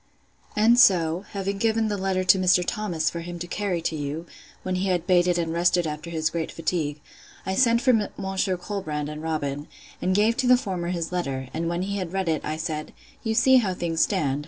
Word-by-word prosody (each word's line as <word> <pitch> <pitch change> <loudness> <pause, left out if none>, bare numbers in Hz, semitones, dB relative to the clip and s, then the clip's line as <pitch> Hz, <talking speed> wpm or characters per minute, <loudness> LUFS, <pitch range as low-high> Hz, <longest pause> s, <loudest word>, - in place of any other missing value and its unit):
And 230 +3 +5
so, 180 -6 +4
having 195 0 -3
given 225 0 +1
the 210 - -1
letter 190 -1 -1
to 185 +1 +5
Mr. 180 -1 +4
Thomas 175 -7 -2
for 170 - -5
him 175 +1 -6
to 170 - -5
carry 180 -2 -2
to 160 - -1
you, 150 +3 -4 0.4
when 185 - -2
he 190 +2 -1
had 175 -2 0
baited 180 -1 +3
and 165 -1 -1
rested 175 +1 +2
after 155 +2 -5
his 160 -1 -1
great 165 -1 -3
fatigue, 155 -3 -2 0.5
I 190 - -1
sent 235 +1 +3
for 230 -6 +3
Monsieur 190 -1 -1
Colbrand, 155 -6 -4
and 150 0 -7
Robin, 145 -2 -3 0.3
and 185 +1 +1
gave 220 +4 +3
to 260 -1 +1
the 250 0 +7
former 185 -8 -3
his 170 -2 -3
letter; 135 -8 -3
and 165 +1 -2
when 170 +1 -1
he 200 +1 -3
had 180 -2 -4
read 190 -3 -1
it, 160 -2 0
I 155 +1 -3
said, 155 -2 -4 0.3
You 225 -1 -1
see 260 +3 +6
how 200 -7 +1
things 165 -2 -1
stand. 145 -9 +1
180 Hz, 215 wpm, -25 LUFS, 160-200 Hz, 0.5 s, the